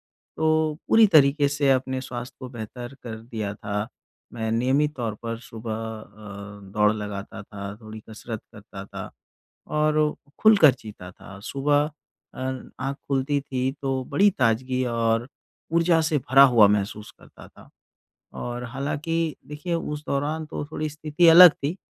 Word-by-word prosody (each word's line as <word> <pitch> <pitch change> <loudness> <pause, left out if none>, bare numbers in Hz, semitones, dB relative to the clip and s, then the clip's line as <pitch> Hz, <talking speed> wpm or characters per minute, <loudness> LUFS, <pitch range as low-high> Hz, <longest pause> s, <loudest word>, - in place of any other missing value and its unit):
तो 155 -1 0
पूरी 225 -1 +7
तरीके 145 -4 +4
से 145 -1 +1
अपने 130 0 0
स्वास्थ्य 125 -1 -7
को 130 - -7
बेहतर 120 +2 -8
कर 115 -2 -6
दिया 110 -3 -5
था। 105 +1 -4 0.4
मैं 110 -1 -3
नियमित 135 +6 +1
तौर 115 -4 -3
पर 115 -1 -4
सुबह 115 -1 -7
अ, 105 -2 -8
दौड़ 105 0 +4
लगाता 105 -2 -6
था, 100 -1 -8
थोड़ी 110 0 -10
कसरत 110 0 -7
करता 100 -2 -10
था - - -8 0.6
और 150 0 +1 0.2
खुलकर 200 -10 +7
जीता 100 -4 -10
था। 95 +1 -13
सुबह 145 +2 +1 0.4
अ, - - -9 0.4
आँख 135 +1 -2
खुलती 140 +1 0
थी 130 -1 -2
तो 135 -1 -1
बड़ी 205 +2 +4
ताज़गी 130 +1 +1
और 115 0 0 0.5
ऊर्जा 170 0 +3
से 155 -2 +1
भरा 135 +2 +5
हुआ 110 -3 +7
महसूस 105 +1 -1
करता - - -15
था। - - -18 0.7
और 120 0 -5
हालाँकि, 150 +5 -2
देखिए, 150 +4 -5
उस 150 -3 -3
दौरान 150 +3 -1
तो 150 - -5
थोड़ी 155 0 -3
स्थिति 155 +3 +1
अलग 170 +1 +10
थी। 145 +5 -4
130 Hz, 150 wpm, -24 LUFS, 110-150 Hz, 0.7 s, अलग